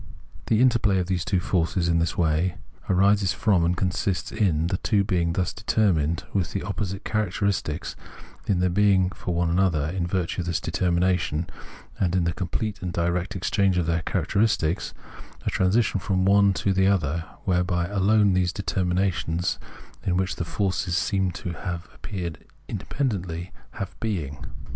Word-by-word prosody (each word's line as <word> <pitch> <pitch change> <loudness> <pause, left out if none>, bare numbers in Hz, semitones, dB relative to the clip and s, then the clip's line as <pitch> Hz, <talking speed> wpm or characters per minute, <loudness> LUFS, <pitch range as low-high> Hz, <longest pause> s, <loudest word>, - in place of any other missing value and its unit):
The 110 0 +3
interplay 115 -6 +4
of 90 - +1
the 95 +1 0
two 95 +1 0
forces 85 -1 0
in 85 -1 +3
this 80 -1 -1
way 85 +2 +1 0.3
arises 100 -1 +3
from 95 -1 +2
and 85 +1 +1
consists 90 0 -1
in 90 -8 +1
the 90 +2 0
two 100 0 +2
being 90 -4 0
thus 90 -1 -1
determined 85 -8 +1
with 95 0 0
opposite 100 0 -3
characteristics, 100 -5 -1 0.5
in 90 -3 +2
their 90 -1 +2
being 95 -1 +3
for 90 -2 -4
one 85 -1 +1
another 85 -5 +2
in 85 0 -2
virtue 90 0 -1
of 90 - -5
this 85 -1 0
determination 85 -1 0 0.5
and 90 -2 +1
in 90 - +2
the 85 -1 0
complete 100 +4 -3
and 90 -1 -3
direct 85 +2 -1
exchange 95 0 +1
of 90 - +1
their 85 0 0
characteristics— 100 -1 0 0.5
a - - 0
transition 100 +2 +2
from 95 +1 0
one 100 0 +5
to 100 0 0
the 95 0 +3
other, 85 -4 +1 0.2
whereby 90 -1 +1
alone 100 +1 +3
these 90 -1 +2
determinations, 90 -2 -1 0.4
in 90 -1 +1
which 95 0 -1
the - - -1
forces 95 -1 -1
seem 95 0 +1
to 90 -1 -5 0.4
appear 90 -5 -5 0.4
independently, 95 - -3 0.2
have 100 -1 -5
being. 80 -11 -3
90 Hz, 155 wpm, -25 LUFS, 85-100 Hz, 0.5 s, one